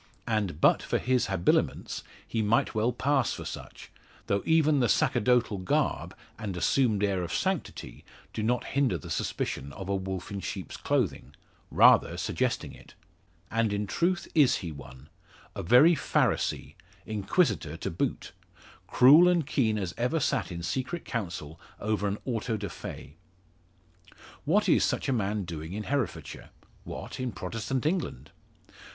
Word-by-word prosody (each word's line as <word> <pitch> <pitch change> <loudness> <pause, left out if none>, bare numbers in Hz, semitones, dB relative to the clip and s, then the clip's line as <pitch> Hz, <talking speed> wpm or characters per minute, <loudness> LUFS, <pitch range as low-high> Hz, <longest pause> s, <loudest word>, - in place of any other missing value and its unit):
And 105 -9 -1
but - - +4
for - - -1
his 125 0 +1
habiliments 95 -3 0 0.2
he 115 - -1
might 110 +2 +2
well 110 +3 +1
pass 135 +1 +1
for - - -7
such; - - -9 0.3
though 100 0 0
even 155 -3 +4
the 120 -3 +2
sacerdotal 115 -2 +2
garb, 90 - -1 0.2
and 100 -5 -4
assumed 110 +1 +2
air 95 -3 +1
of 85 -1 -4
sanctity, 190 -3 -3 0.3
do - - -3
not 120 +3 +1
hinder 135 -10 0
the 70 - -9
suspicion 70 +1 -3
of 95 +5 -7
a 100 - +1
wolf 95 0 -4
in 100 - -4
sheep's - - -6
clothing 70 - -1 0.3
rather - - +5
suggesting - - -1
it. - - -16 0.6
And 115 -1 +1
in 105 0 -1
truth 175 - 0
is 145 -6 +5
he 85 - -4
one; 70 -1 -12 0.5
a - - -3
very 125 - +6
Pharisee - - 0 0.3
Inquisitor 105 - 0
to - - -4
boot, 85 - -2 0.6
cruel 150 +8 +7
and 175 -4 +2
keen 115 -7 +1
as 95 -4 -3
ever 125 +7 +1
sate 135 -7 0
in 85 -1 -6
secret 130 - -3
Council 85 - -5 0.2
over 105 -1 -1
an 100 +1 -2
Auto 115 -2 -2
da 100 -1 -5
Fe. 75 - -9 1.3
What - - +2
is - - +4
such - - 0
a - - +2
man 105 -3 -1
doing 80 -1 -6
in 105 +1 -4
Herefordshire? 140 0 -3 0.4
What, - - -7
in 130 -1 -2
Protestant 115 +8 -3
England? 155 - -2
110 Hz, 150 wpm, -28 LUFS, 95-130 Hz, 1.3 s, cruel